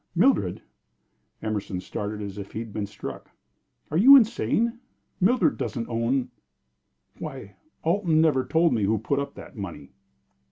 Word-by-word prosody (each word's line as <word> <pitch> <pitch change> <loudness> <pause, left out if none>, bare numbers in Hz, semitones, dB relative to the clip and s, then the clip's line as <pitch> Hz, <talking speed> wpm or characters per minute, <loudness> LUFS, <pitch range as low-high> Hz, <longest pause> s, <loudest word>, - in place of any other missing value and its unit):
"Mildred!" - - +2 0.8
Emerson 105 -4 -3
started 105 +3 -5
as 100 0 -6
if 100 - -8
he - - -6
had 115 -2 -6
been 105 -2 -3
struck. 105 - -8 0.6
"Are 155 - +1
you 260 +9 +9
insane? 235 0 +1 0.4
Mildred 250 +9 +3
doesn't 115 -4 -3
own 120 +3 0 0.9
Why, 100 0 -7 0.3
Alton 170 -1 +2
never 150 -5 +3
told 165 +4 +2
me 110 -4 +1
who 110 +3 +2
put 135 +7 -1
up 140 0 -5
that - - -11
money!" 100 -5 -7
120 Hz, 145 wpm, -25 LUFS, 105-170 Hz, 0.9 s, you